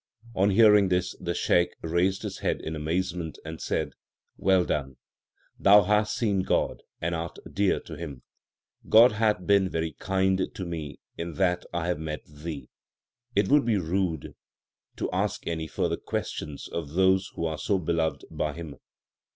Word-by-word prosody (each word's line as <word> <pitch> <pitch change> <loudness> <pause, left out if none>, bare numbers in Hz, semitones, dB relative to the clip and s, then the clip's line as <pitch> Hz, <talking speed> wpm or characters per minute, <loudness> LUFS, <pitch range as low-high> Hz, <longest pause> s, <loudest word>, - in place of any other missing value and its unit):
3 95 - -2
On 100 - +5
hearing 105 -1 +6
this 90 0 0
the 85 0 -3
Shaikh 85 -1 +2
raised 90 +4 +1
his - - -5
head - - 0
in 80 - -5
amazement 85 +1 -2
and 80 0 -7
said, - - -1 0.4
Well 95 -2 +3
done. 65 -3 -2 0.6
Thou 100 +1 +7
hast 105 +2 +1
seen 105 -5 +1
God, - - 0 0.2
and 85 +1 -1
art 85 0 -4 0.2
dear 100 -1 +2
to - - -10
Him. 70 -7 -7 0.7
God 115 +3 +8
hath 105 -4 +1
been 100 -1 +4
very 80 -1 -2
kind 95 +5 0
to 95 - -4
me 80 -4 -5 0.2
in 85 -1 -4
that 90 -2 +1
I 85 -1 -2
have 90 -3 -1
met 75 -1 -5
thee. 75 -3 -7 0.7
It - - +2
would 145 0 +5
be 115 -3 +2
rude 85 -3 -1 0.6
to - - -3
ask - - -1
any 80 -1 -2
further - - -1
questions 75 -2 -4
of 80 -3 -5
those 95 +1 +3
who 85 - -2
are 80 -1 -2
so 100 - +1
beloved 80 -2 -1
by 75 -1 -2
Him. 80 -3 -8
85 Hz, 165 wpm, -27 LUFS, 80-95 Hz, 0.7 s, God